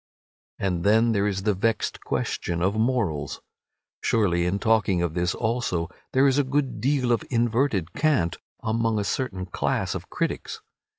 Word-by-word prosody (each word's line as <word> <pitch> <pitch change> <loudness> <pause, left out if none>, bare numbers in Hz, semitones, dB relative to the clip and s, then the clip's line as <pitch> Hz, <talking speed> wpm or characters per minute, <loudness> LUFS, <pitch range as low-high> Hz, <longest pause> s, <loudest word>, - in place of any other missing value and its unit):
And 90 -3 -1
then 110 +3 +4
there 100 -2 +2
is 95 -1 -2
the 105 0 +2
vexed 110 +4 -1
question 85 0 -2
of 95 +2 +2
morals. 110 - 0 0.6
Surely 90 -6 +2
in 95 +3 0
talking 100 -5 +2
of 85 -3 -1
this 90 +1 0
also 110 -8 -1 0.2
there 130 +1 +5
is 140 0 +4
a - - +4
good 135 -4 -1
deal 130 -1 +1
of 115 - +2
inverted 115 - +1
cant 140 - +1 0.3
among 115 0 +1
a 105 - 0
certain 95 -5 -2
class 90 - -1
of - - -6
critics. - - -3
110 Hz, 160 wpm, -25 LUFS, 90-120 Hz, 0.6 s, there